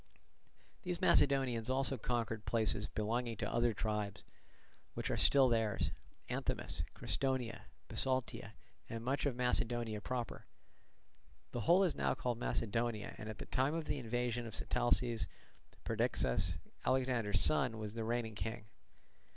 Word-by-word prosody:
These 180 -4 -2
Macedonians 130 -5 +3
also 135 +1 +2
conquered 115 -2 -2
places 105 -1 +2
belonging 115 +2 -1
to - - -2
the - - -3
other 120 0 +3
tribes, 105 -2 -2 0.7
which - - -2
are - - +1
still 135 -2 +6
theirs—Anthemus, 115 -4 -2
Crestonia, 130 -4 -1 0.2
Bisaltia, 130 -5 -1 0.4
and 115 0 -5
much 140 +3 +1
of 135 - -1
Macedonia 120 -3 0
proper. 125 +1 -4 1.0
The 120 - -3
whole 175 - +5
is 180 - +2
now - - 0
called 120 -2 -2
Macedonia, 115 -2 -1
and 110 - -6
at 110 - -6
the - - -6
time 135 +4 +1
of 165 -1 -2
the 145 -1 -2
invasion 120 0 -1
of 110 - -4
Sitalces, 120 -1 +1 0.6
Perdiccas, 60 - +1 0.3
Alexander's 125 -6 +2
son, 125 -7 +3
was 105 -1 -5
the 115 -1 -3
reigning 115 0 -1
king. 110 0 -4
120 Hz, 135 wpm, -36 LUFS, 110-130 Hz, 1.0 s, still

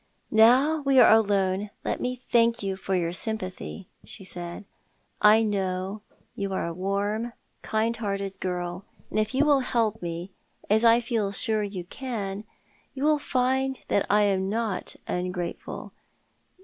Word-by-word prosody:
" - - -44
Now 255 +8 +5
we 275 -2 +4
are 245 - +8
alone 200 -2 +2 0.2
let - - -1
me 250 0 -1
thank 235 -2 +2
you 195 -1 -1
for 190 0 -2
your 170 -1 0
sympathy," 190 -2 -4 0.2
she - - -8
said. 175 +1 -7 0.6
"I 215 +1 +7
know 195 -1 -2 0.3
you 200 -1 -3
are 190 - -1
a 200 +6 -2 0.3
kind, 220 +2 0
warm 230 - -11
hearted 195 -2 -3
girl, 180 0 -3 0.3
and - - 0
if 215 +4 -1
you 280 +3 +4
will 290 -2 +5
help 230 -4 0
me 170 +2 -5 0.2
— - - -27
as 220 +2 +4
I 230 +1 +6
feel 225 -4 -1
sure 215 +1 0
you 200 -3 -4
can 205 -1 -5 0.2
— - - -36
you 270 - -4
shall 305 0 +4
find 265 0 0
that 200 - +1
I 210 +1 +4
am 190 -1 +1
not 220 -2 -2
ungrateful. 180 -1 -4
210 Hz, 160 wpm, -26 LUFS, 190-235 Hz, 0.6 s, are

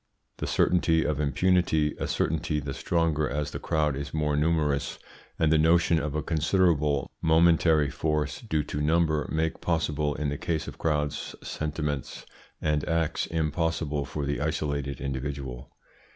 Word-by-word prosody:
The - - -3
certainty 80 -2 +2
of 75 -2 -1
impunity, 80 0 +2
a - - -2
certainty 75 -1 0
the 70 -1 -5
stronger 80 -1 0
as 75 0 -2
the - - -5
crowd 75 -3 0
is 70 +1 -5
more 75 -1 +1
numerous, 75 -2 +1 0.4
and 80 -2 +2
the 80 - +4
notion 85 +1 +4
of 75 -1 -3
a 75 - -1
considerable 80 -3 +1
momentary 80 -2 +4
force 75 -1 -1
due 80 -10 -1
to 75 - -4
number, 80 -1 +2
make 80 0 -1
possible 75 -3 0
in 75 0 -1
the 70 - -4
case 80 -2 -2
of - - -8
crowds 75 -2 -1
sentiments 75 -2 -4 0.3
and 75 -1 0
acts 80 -2 0
impossible 80 -2 -1
for 75 +1 -4
the 70 +1 -2
isolated 70 -2 -2
individual. 70 -2 -5
75 Hz, 150 wpm, -27 LUFS, 75-80 Hz, 0.4 s, the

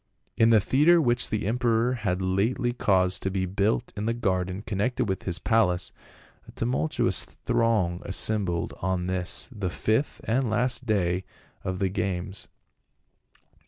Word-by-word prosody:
In 115 - +4
the 115 -2 +6
theatre 150 - +4
which 120 -5 +2
the 110 -2 -2
emperor 120 +1 +1
had 95 -6 -2
lately 115 +7 0
caused 95 -6 +2
to 95 - -1
be 95 -1 -1
built 100 +6 -1
in 105 +1 -3
the 115 - 0
garden 95 -3 -1
connected 110 +5 -1
with 95 -1 -3
his 85 -2 -1
palace, 95 -2 +1 0.6
a - - -11
tumultuous 70 +6 +1
throng 105 -7 0
assembled 95 -3 +1
on 95 -1 -1
this 90 -1 -1
the 100 -6 -3
fifth 110 +12 -1
and 130 -1 0
last 125 +3 0
day 95 -4 +1 0.4
of 95 0 -3
the 95 0 0
games. 95 0 -3
100 Hz, 145 wpm, -26 LUFS, 95-115 Hz, 0.6 s, the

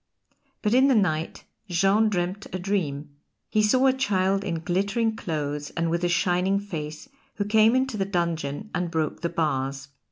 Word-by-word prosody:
But 210 0 +2
in 260 +2 +5
the 270 - +4
night 165 -6 0 0.3
Jean 195 +5 +3
dreamed 185 +1 -2
a - - -2
dream: 155 -7 -3 0.3
he 215 - +3
saw 255 +5 +3
a 265 - +5
child 195 -7 +1
in 170 -5 -3
glittering 200 +6 0
clothes 150 -5 -3
and 165 -1 0
with 170 +1 -1
a 175 - +2
shining 180 +3 +2
face 160 - -6 0.3
who 205 - -2
came 220 +3 +4
into 260 -3 0
the 195 - 0
dungeon 170 -1 -2
and 180 -1 -1
broke 160 -3 -2
the 170 - -1
bars. 135 -4 -2
180 Hz, 170 wpm, -25 LUFS, 160-210 Hz, 0.3 s, in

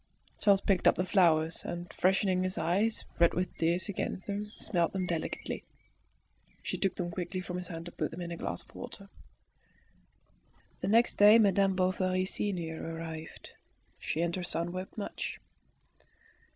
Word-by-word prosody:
Charles 200 -2 +4
picked 195 -3 +2
up - - +6
the 180 - 0
flowers, 165 -4 +3
and 175 0 -6
freshening 190 0 +2
his 185 0 -2
eyes, 205 +6 +1
red 170 0 +5
with 185 +1 -1
tears, 170 +4 +2
against 190 -1 -3
them, 205 +1 -4
smelt 170 -4 0
them 190 -1 -1
delicately. 170 -3 -3 1.0
She - - -2
took 195 - +1
them 175 -2 -3
quickly 185 +1 -3
from 180 0 -4
his 180 - -5
hand 165 0 -6
and 175 - -10
put - - -1
them 170 - -7
in 170 -1 -5
a - - -3
glass - - -3
of - - -23
water. 205 -5 -9 1.7
The - - -3
next 230 +4 +3
day 210 +2 +9
Madame 195 -3 +4
Bovary 185 0 +1
senior 175 -5 -3
arrived. 165 -1 -7 0.5
She 160 - -2
and 170 0 0
her 185 - -3
son 175 0 -1
wept 185 +4 -6
much. 205 - -4
185 Hz, 165 wpm, -31 LUFS, 170-195 Hz, 1.7 s, day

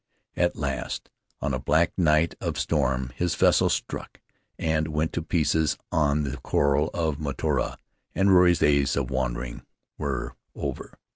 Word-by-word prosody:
At 90 0 +1
last, 70 -3 -4 0.3
on 70 -2 -1
a 65 - -1
black 80 +5 +2
night 80 -2 +3
of - - -2
storm, 65 0 0
his 90 -1 0
vessel - - +4
struck - - -4 0.4
and 80 -1 0
went 80 0 -1
to 85 - -1
pieces 80 -2 +1
on 75 -1 +2
the 70 +1 -3
coral 70 +3 +1
of 80 -3 -1
Mataora, 70 -3 -1 0.4
and 95 +1 +3
Ruri's 90 -2 +6
days 70 -2 +3
of - - -2
wandering 65 -2 -2 0.4
were 70 -3 -3 0.2
over. - - -5
75 Hz, 145 wpm, -26 LUFS, 70-80 Hz, 0.4 s, Ruri's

